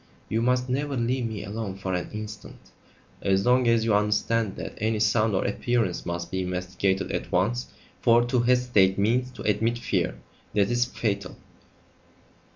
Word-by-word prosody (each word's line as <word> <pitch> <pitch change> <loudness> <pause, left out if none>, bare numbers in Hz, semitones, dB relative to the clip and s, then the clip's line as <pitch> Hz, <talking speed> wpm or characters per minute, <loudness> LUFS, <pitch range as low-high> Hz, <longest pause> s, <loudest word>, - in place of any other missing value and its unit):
"You 110 - 0
must 125 +1 +1
never 140 +2 -1
leave 120 +1 0
me 110 -2 -5
alone 105 -1 -5
for 95 -1 -4
an 90 0 -2
instant." 105 0 -9 0.5
"As 95 +1 +1
long 125 0 +4
as 115 -1 +3
you 110 - +2
understand 105 0 +1
that - - -6
any 110 0 0
sound 110 -1 +2
or - - 0
appearance 115 -3 -1
must 85 0 -4
be 95 - -1
investigated 90 +1 -1
at - - -4
once, 115 +8 +1 0.3
for 120 0 +5
to 125 +1 +1
hesitate 120 -6 +3
means 120 +5 +1
to 115 - -9
admit 115 +3 +1
fear. 120 - -1 0.4
That 100 +1 +3
is 120 0 +2
fatal." 100 -6 -3
110 Hz, 160 wpm, -26 LUFS, 95-120 Hz, 0.5 s, for